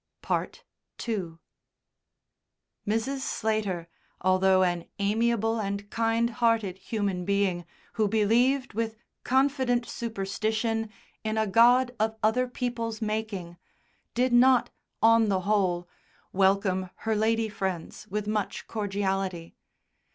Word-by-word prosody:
II -, -, +1 dB, 2.4 s
Mrs. 225 Hz, +6 st, 0 dB
Slater, 215 Hz, -9 st, -2 dB, 0.3 s
although 185 Hz, 0 st, +4 dB
an 175 Hz, -2 st, 0 dB
amiable 225 Hz, +2 st, +1 dB
and 200 Hz, -1 st, -3 dB
kind 230 Hz, +1 st, +1 dB
hearted 225 Hz, -5 st, +1 dB
human 200 Hz, -3 st, -2 dB
being 190 Hz, -3 st, 0 dB, 0.3 s
who 215 Hz, -2 st, +1 dB
believed 235 Hz, +6 st, +2 dB
with 225 Hz, 0 st, -2 dB, 0.3 s
confident 260 Hz, -2 st, +2 dB
superstition 220 Hz, +1 st, -2 dB, 0.3 s
in 220 Hz, 0 st, -2 dB
a 220 Hz, -, +2 dB
God 245 Hz, +4 st, +4 dB
of 220 Hz, +1 st, 0 dB
other 250 Hz, +4 st, +2 dB
people's 235 Hz, -3 st, -3 dB
making, 210 Hz, -6 st, -3 dB, 0.6 s
did 250 Hz, +1 st, +2 dB
not, 250 Hz, +1 st, +5 dB, 0.3 s
on 225 Hz, -1 st, +5 dB
the 190 Hz, -2 st, +1 dB
whole, 185 Hz, -3 st, +1 dB, 0.5 s
welcome 190 Hz, -1 st, +2 dB, 0.2 s
her 220 Hz, -1 st, +1 dB
lady 225 Hz, +1 st, +1 dB
friends 190 Hz, -5 st, -4 dB
with 210 Hz, +2 st, -3 dB
much 210 Hz, -1 st, -2 dB
cordiality. 195 Hz, -4 st, -2 dB
215 Hz, 105 wpm, -27 LUFS, 195-230 Hz, 2.4 s, not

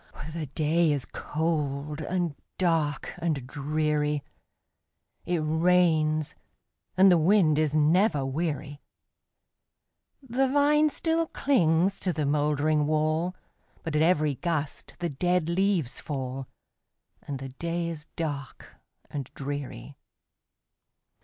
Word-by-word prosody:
The 160 Hz, -2 st, -4 dB
day 155 Hz, +3 st, +2 dB
is 140 Hz, -3 st, -1 dB
cold, 150 Hz, -2 st, -2 dB
and 175 Hz, 0 st, -1 dB, 0.2 s
dark, 160 Hz, -6 st, 0 dB
and 155 Hz, -7 st, -1 dB
dreary; 150 Hz, +1 st, -1 dB, 1.0 s
It 175 Hz, -2 st, +1 dB
rains, 160 Hz, -1 st, +2 dB, 0.6 s
and 190 Hz, 0 st, +7 dB
the 175 Hz, -, +5 dB
wind 160 Hz, -3 st, +4 dB
is 155 Hz, -1 st, +1 dB
never 155 Hz, 0 st, +3 dB
weary; 145 Hz, 0 st, -3 dB, 1.5 s
The 260 Hz, +3 st, +1 dB
vine 295 Hz, +3 st, +4 dB
still 325 Hz, +3 st, 0 dB
clings 190 Hz, -, +2 dB
to 185 Hz, -, 0 dB
the 150 Hz, -1 st, -1 dB
moldering 150 Hz, +1 st, +1 dB
wall, 155 Hz, +3 st, 0 dB, 0.5 s
But 160 Hz, -2 st, -3 dB
at 150 Hz, -, +3 dB
every 155 Hz, -3 st, +3 dB
gust 155 Hz, -1 st, -3 dB
the 175 Hz, -, -2 dB
dead 175 Hz, +3 st, 0 dB
leaves 180 Hz, -6 st, +1 dB
fall, 135 Hz, -2 st, -4 dB, 0.7 s
And 140 Hz, -, -5 dB
the 135 Hz, 0 st, -7 dB
day 170 Hz, +5 st, -3 dB
is 160 Hz, -3 st, -5 dB
dark 145 Hz, -5 st, -5 dB, 0.3 s
and 140 Hz, -3 st, -5 dB
dreary. 140 Hz, -, -6 dB
155 Hz, 110 wpm, -27 LUFS, 145-175 Hz, 1.5 s, and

